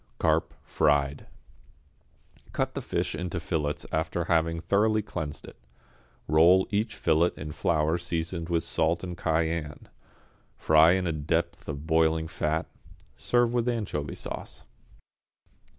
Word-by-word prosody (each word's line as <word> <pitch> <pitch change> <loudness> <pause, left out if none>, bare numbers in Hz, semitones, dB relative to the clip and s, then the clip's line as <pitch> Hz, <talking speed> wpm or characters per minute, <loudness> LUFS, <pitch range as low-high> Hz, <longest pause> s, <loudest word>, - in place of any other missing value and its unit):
=Carp, - - +1
Fried.= 70 -1 +1 1.3
Cut - - -1
the - - -4
fish - - -2
into 90 +2 -3
fillets 75 -3 -2
after 80 +2 -1
having 80 0 +1
thoroughly 110 +4 +2
cleansed 80 -7 -5
it. - - -13 0.7
Roll 85 +5 +5
each 105 +2 0
fillet 80 +3 +3
in 75 0 -6
flour 80 +2 +1
seasoned 85 0 -3
with 85 -2 +1
salt 80 +2 0
and 90 -1 -5
cayenne. 80 -2 -2 0.7
Fry 80 +2 +5
in 95 0 0
a 85 - 0
depth 80 +3 -2
of 75 0 -5
boiling 80 0 +2
fat, 80 0 -1 0.5
serve 120 -1 +1
with 120 0 +1
anchovy 85 - -3
sauce. - - -8
80 Hz, 125 wpm, -27 LUFS, 80-90 Hz, 1.3 s, Roll